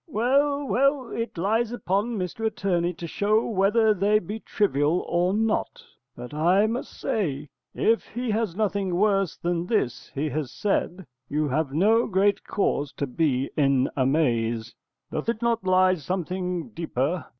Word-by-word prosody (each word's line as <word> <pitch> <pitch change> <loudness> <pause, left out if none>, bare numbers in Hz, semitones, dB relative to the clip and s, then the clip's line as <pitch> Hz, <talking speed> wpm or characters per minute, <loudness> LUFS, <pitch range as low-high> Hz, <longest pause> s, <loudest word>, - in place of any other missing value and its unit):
_ - - -60
Well, 280 +5 +2
well, 275 -1 +1
it 230 -5 -4
lies 220 +6 +1
upon 215 0 -1
Mr 185 +4 -4
Attorney 190 -6 0
to 170 - -7
show 210 +6 +1
whether 215 +1 +3
they 205 +2 +3
be 210 +2 -5
trivial 170 -7 +1
or 175 +2 +1
not: 220 +2 -1 0.3
but 125 +3 -9
I 175 +7 +3
must 230 +3 -4
say, 150 -9 -2 0.3
if 225 +1 +1
he 245 0 -2
has 215 -5 -1
nothing 200 -3 -1
worse 195 -2 +1
than 175 0 -2
this 125 - -1
he 145 +3 -1
has 145 -1 -3
said, 190 -3 -1 0.2
you 150 +1 0
have 145 +1 0
no 215 +10 +3
great 200 +1 +2
cause 145 -8 -1
to 140 - -2
be 135 -1 0
in 135 -3 +2
amaze. 120 -5 0 0.4
Doth 155 - -3
it 230 0 -2
not 235 -3 +1
lie 185 0 +5
something 180 - -3
deeper? 165 - -2
185 Hz, 155 wpm, -25 LUFS, 155-220 Hz, 0.4 s, lie